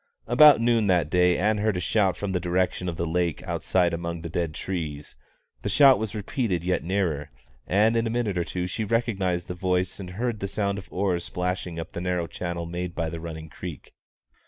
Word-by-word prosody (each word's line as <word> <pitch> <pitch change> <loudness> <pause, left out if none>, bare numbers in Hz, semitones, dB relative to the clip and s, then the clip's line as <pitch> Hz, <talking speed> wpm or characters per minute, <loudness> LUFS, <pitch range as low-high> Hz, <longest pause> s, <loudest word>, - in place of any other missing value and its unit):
About 150 -4 +7
noon 115 -2 +2
that 90 -5 +2
day 90 -1 +4
Ann 105 +2 +1
heard 105 -2 +1
a - - 0
shout 95 0 +1
from 100 -1 -3
the 90 - 0
direction 90 +1 0
of 85 - -5
the 85 - -1
lake 85 0 -1
outside 90 -2 +1
among 85 0 -4
the 85 - -5
dead 85 -3 -2
trees; 75 -6 -4 0.5
the - - -2
shout 135 +4 +6
was 110 0 -4
repeated 105 - -1
yet 90 +1 0
nearer, 85 -6 -1 0.4
and 105 +4 +3
in 115 0 +1
a - - -1
minute 115 -4 -1
or 90 - +1
two 90 +2 -3
she 95 +5 -3
recognised 100 -6 0
the 90 - -4
voice 90 +1 -1
and 95 -2 -6
heard 120 -2 -1
the 100 - -2
sound 100 0 -1
of 95 - -12
oars 90 -2 0
splashing 90 -2 -3
up 80 - -6
the 85 - -5
narrow 90 -1 -1
channel 85 0 -4
made 85 +1 -4
by 80 -2 -2
the 85 - -5
running 80 -1 -7
creek. 80 -2 -9
90 Hz, 210 wpm, -26 LUFS, 85-100 Hz, 0.5 s, About